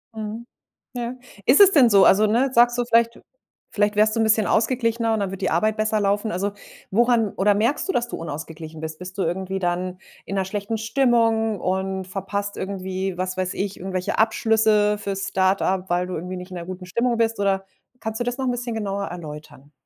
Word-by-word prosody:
Mhm. 220 +2 -6 0.5
Ja. 240 -1 -3 0.3
Ist 255 - +6
es 395 -1 +9
denn 270 -9 +6
so, 200 -3 +6
also, 210 +3 +5
ne, 240 +6 +2
sagst 240 0 +5
du 245 - +1
vielleicht 230 0 +2 0.5
vielleicht 205 0 0
wärst 215 +1 +4
du - - 0
'n - - +3
bisschen 220 -1 +3
ausgeglichener 230 -1 +1
und 220 - 0
dann 200 -2 -1
würde 195 - -6
die 190 - 0
Arbeit 215 +6 +1
besser 215 0 +1
laufen, 205 +2 0
also, 200 +3 -2 0.4
woran 230 0 +2
oder 205 +2 +3
merkst 230 - 0
du, - - +1
dass 240 -8 0
du - - -5
unausgeglichen 160 0 -7
bist? 160 0 -5
Bist 180 +2 -9
du 195 - 0
irgendwie 190 +3 -2
dann 180 0 -2 0.3
in 195 - -5
'ner 190 -1 0
schlechten 205 +3 -3
Stimmung 225 -2 +2
und 190 +1 -2
verpasst 200 +1 -4
irgendwie, 190 -1 -4
was 185 0 -3
weiß 185 -1 -1
ich, 200 0 -3
irgendwelche 185 0 -3
Abschlüsse 220 -1 +3
fürs 195 -2 -3
Start-up, 190 0 +1
weil 175 +1 0
du 185 - -4
irgendwie 180 +3 -5
nicht 180 +1 -8
in - - -7
'ner 170 - -6
guten 185 0 -7
Stimmung 235 +6 0
bist 225 -1 0
oder 195 -1 +1 0.3
kannst 220 -1 -4
du - - 0
das 245 +1 -3
noch 265 - -2
’n 250 - +1
bisschen 245 -1 -3
genauer 200 -2 -2
erläutern? 150 -4 -9
200 Hz, 210 wpm, -23 LUFS, 185-225 Hz, 0.5 s, es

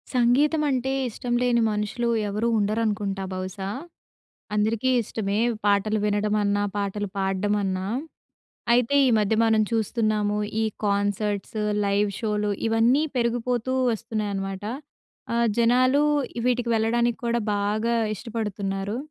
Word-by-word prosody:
సంగీతం 275 +6 +3
అంటే 265 0 0 0.2
ఇష్టం 240 +1 -4
లేని 240 -1 +3
మనుషులు 210 +3 -1 0.2
ఎవరూ 210 +3 -1
ఉండరనుకుంటా 205 -2 -1
బహుశా. 190 +1 -4 0.9
అందరికీ 220 +4 +1
ఇష్టమే. 210 -1 -2 0.3
పాటలు 205 +1 +2
వినడమన్నా, 205 0 +1
పాటలు 205 0 -2
పాడ్డమన్నా. 195 0 0 0.9
అయితే 245 +3 +3
ఈ - - +4
మధ్య 210 +1 +2
మనం 220 -1 +3
చూస్తున్నాము. 215 -2 0 0.2
ఈ - - +2 0.2
కాన్సర్ట్స్, 205 +1 -1 0.3
లైవ్ 200 +1 +1
షోలు 210 -2 0 0.2
ఇవన్నీ 230 +6 +3
పెరిగిపోతూ 245 +1 0 0.2
వస్తున్నాయి 220 -2 -3
అనమాట. 195 0 -4 0.7
ఆహ్, 235 0 +2
జనాలు 255 +4 +4 0.4
వీటికి 245 -1 +1
వెళ్ళడానికి 235 +2 +1
కూడా 235 0 +1 0.2
బాగా 215 +3 0 0.2
ఇష్టపడుతున్నారు. 205 -2 -3
215 Hz, 105 wpm, -25 LUFS, 205-235 Hz, 0.9 s, ఈ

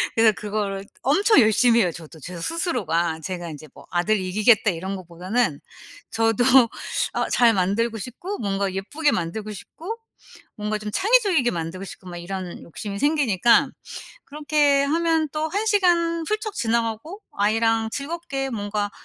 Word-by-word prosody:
그래서 225 -1 +5
그거를 200 -1 -3 0.2
엄청 395 - +4
열심히 230 +2 +4
해요 180 -3 +1
저도 160 -1 -12
제가 175 +3 -7
스스로가. 170 - -1
제가 175 0 -5
이제 155 0 -10
뭐 - - -15
'아들 180 +5 +2
이기겠다.' 210 +4 +3
이런 190 +3 -4
것보다는 185 +1 -2 0.5
저도 225 +1 +2 0.7
아 - - 0
잘 235 -2 +4
만들고 210 +4 0
싶고 255 - -6
뭔가 195 -2 -1
예쁘게 290 +11 0
만들고 210 +6 -3
싶고 340 - -8 0.6
뭔가 210 0 -2
좀 210 0 -6
창의적이게 390 - +3
만들고 170 +3 -5
싶고 185 -1 -10
막 175 - -7
이런 180 0 -6
욕심이 200 +4 -6
생기니까 245 - +3 0.6
그렇게 290 -1 +2
하면 320 +1 +1
또 310 +1 -1
1 410 +6 -2
시간 345 -5 +2
훌쩍 430 -1 -2
지나가고 230 - -2
아이랑 225 +2 +1
즐겁게 280 -1 -4
뭔가 205 -2 -2
225 Hz, 320 characters per minute, -23 LUFS, 190-295 Hz, 0.7 s, 그래서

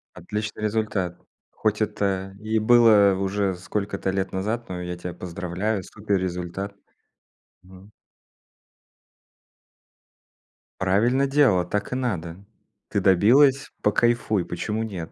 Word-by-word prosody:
Отличный 105 +5 -5
результат! 105 -5 -1 0.3
Хоть 110 0 -1
это 100 -2 -1
и 110 +1 0
было 110 -3 +6
уже 95 0 -1
сколько-то 100 +1 -3
лет 95 0 -2
назад, 110 +5 -3
но 90 -1 -4
я 90 0 -4
тебя 90 0 -6
поздравляю 90 +4 -3
супер 100 +1 -2
результат! 95 +2 -4 0.9
Мгм. 95 +2 -16 2.9
Правильно 115 +9 +2
делала, 135 -11 +3
так 105 +6 -3
и - - -1
надо, 95 -8 -3 0.5
ты 100 - 0
добилась- 130 +10 +4
покайфуй, 110 -2 +2
почему 105 +6 -3
нет? 90 -7 -6
100 Hz, 105 wpm, -24 LUFS, 95-110 Hz, 2.9 s, было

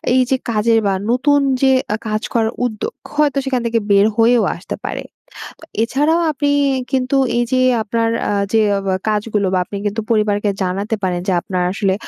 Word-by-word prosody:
এইযে 260 0 +2
কাজের 225 +1 +2
বা, 195 - +1 0.2
নতুন 285 +4 +3 0.2
যে 265 - +4 0.2
আ - - +1
কাজ 215 0 -1
করার 225 -1 +1
উদ্যোগ, 245 - -4 0.2
হয়তো 295 -2 +2
সেখান 260 -3 0
থেকে 230 0 +1
বের 200 +1 +5
হয়েও 230 0 +4
আসতে 175 - -6
পারে। - - -4 0.6
তো - - -12 0.2
এছাড়াও 295 +8 +1
আপনি 290 0 0 0.4
কিন্তু 260 +1 +1 0.2
এইযে 240 +2 0 0.2
আপনার 230 +1 -1 0.2
আ - - 0 0.2
যে 225 - +4 0.2
অব 195 - -6 0.2
কাজগুলো, 210 -1 0
বা - - +3
আপনি 200 - -7
কিন্তু 205 +2 -1
পরিবারকে 210 -2 +1
জানাতে 195 +4 -2
পারেন 180 -2 -1
যে - - +3
আপনার 180 0 -3
আসলে 195 -1 0
225 Hz, 175 wpm, -18 LUFS, 205-255 Hz, 0.6 s, বের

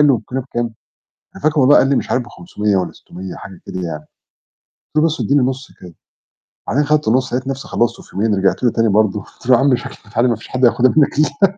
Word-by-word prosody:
والكيلو 125 +3 -4
بكام؟ 120 -3 -4 0.6
أنا - - -12
فاكر 155 0 +2
والله 140 +2 +6
قال - - +4
لي 140 - +3
مش - - -2
عارف 125 - +1
ب500 105 - -3
والَّا 90 - -1
600 95 +1 -10
حاجة 95 -3 -11
كده 95 - -5
يعني، 85 -3 -4 0.7
قلت - - -62
له - - +5
بس 160 0 0
ادّيني 140 0 +2
نُصّ 130 +1 -3
كده، 90 -2 -11 0.7
وبعدين 145 +7 +1
خدت 150 -1 +1
النُصّ، 130 +3 +1
لقيت 130 +1 -2
نفسي 135 0 -4
خلّصتُه 120 0 -1
في - - -19
يومين، 105 +2 +1
رجعت 95 +5 +1
له 120 - +4
تاني 115 0 +1
برضه 105 0 +2
قلت 110 - -16
له 130 - +7
يا - - +3
عم 135 -1 +4
شكل 120 - -8
البتاع 110 +3 -1
دي 125 - +4
مافيش 115 -2 -2
حد 130 0 +1
هياخدها 125 +1 +4
منك 145 -1 +3
الَّا 155 - +4
أنا. 195 0 +3
125 Hz, 240 wpm, -18 LUFS, 105-135 Hz, 0.7 s, له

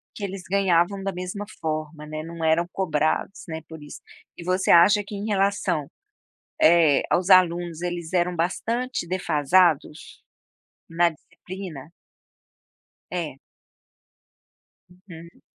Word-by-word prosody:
Que 205 - -8
eles 195 -2 -5
ganhavam 195 0 +2
da 195 - -1
mesma 185 +3 -5 0.2
forma, 155 -1 -4
né, 155 0 -6
não 165 0 -7
eram 160 +2 +2
cobrados, 160 +1 -1
né, 160 0 -5
por 160 -2 -11
isso. 145 - -11 0.4
E 170 - -8
você 185 +1 +1
acha 205 +5 +6
que 205 - -8
em 200 +1 -5
relação, 195 -7 0 0.7
eh, 160 -3 +5
aos 180 +2 +1
alunos 175 -2 +3
eles 175 -2 -4
eram 180 0 +1
bastante 230 +6 -2
defasados, 165 -2 +1 0.7
na 170 +1 +2
disciplina? 165 -1 -10 1.2
É. 165 -7 -4 1.5
Uhum. 180 -2 -14
175 Hz, 115 wpm, -24 LUFS, 160-190 Hz, 1.5 s, acha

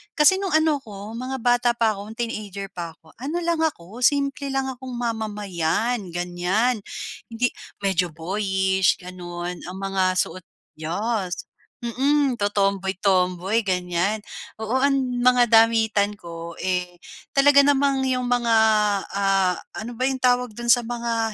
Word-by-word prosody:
kasi 300 +3 +6
no'ng 390 -3 -2
ano 310 -2 +2
ko, 205 -3 -9
mga 255 +3 -4
bata 245 0 +3
pa 220 -3 +2
ko, 200 - -8
teenager 205 -4 -5
pa 170 -3 -6
ko, 160 - -18
ano 290 +7 -3
lang 335 -1 0
ako, 230 - -3
simple 280 +1 +2
lang 270 0 -1
akong 255 0 -8
mamamayan 215 -2 -1
ganyan, 180 +7 0 0.5
hindi 235 +2 0 0.3
medyo 190 -2 +2
boyish 190 +2 +1
gano'n, 175 -1 -6
ang 180 +2 -7
mga 190 -1 +1
suot, 185 - -2 0.4
yas, 185 +3 -2 0.4
mm, 270 +3 +1
totomboy-tomboy, 195 -1 +1
ganyan. 180 +3 0 0.4
Oo, 225 +4 0
ang 275 -1 +3 0.2
mga 250 -1 +5
damitan 220 -2 +4
ko, 170 -1 -8
eh, 180 -1 -1 0.4
talaga 280 +1 +6
namang 280 -1 +3
yung 255 -1 0
mg, 245 -1 +2 0.7
ah, 195 -2 +2 0.2
ano 225 +2 -5
ba 255 - 0
yung 265 -1 -1
tawag 250 -1 +2
dun 240 +1 -5
sa 245 - +6
mga 230 -2 -2
215 Hz, 135 wpm, -23 LUFS, 185-250 Hz, 0.7 s, kasi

